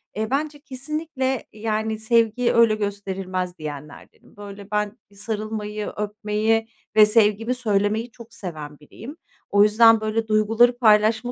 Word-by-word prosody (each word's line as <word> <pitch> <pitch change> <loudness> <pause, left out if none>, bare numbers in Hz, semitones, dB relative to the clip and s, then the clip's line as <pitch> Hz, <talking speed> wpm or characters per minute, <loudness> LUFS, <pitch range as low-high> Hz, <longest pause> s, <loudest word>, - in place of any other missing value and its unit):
eee, 215 +1 -3
"Bence 290 +1 -2
kesinlikle, 275 -2 -4
yani, 220 0 -3
sevgi 230 +1 +1
öyle 230 -2 +4
gösterilmez." 190 -3 -4
diyenlerdenim. 150 +4 -10
Böyle, 200 0 -11
ben 210 +1 -2
bir 200 - -21
sarılmayı, 210 0 -5
öpmeyi 215 +1 -1 0.3
ve 215 - +8
sevgimi 220 +2 +2
söylemeyi 215 0 -1
çok 235 0 -15
seven 155 -8 -8
biriyim. 235 - -12 0.3
O 205 0 +5
yüzden 225 +1 +5
böyle 220 +1 -2
duyguları 225 +3 +3
paylaşma 220 +1 +3
215 Hz, 125 wpm, -22 LUFS, 205-230 Hz, 0.3 s, ve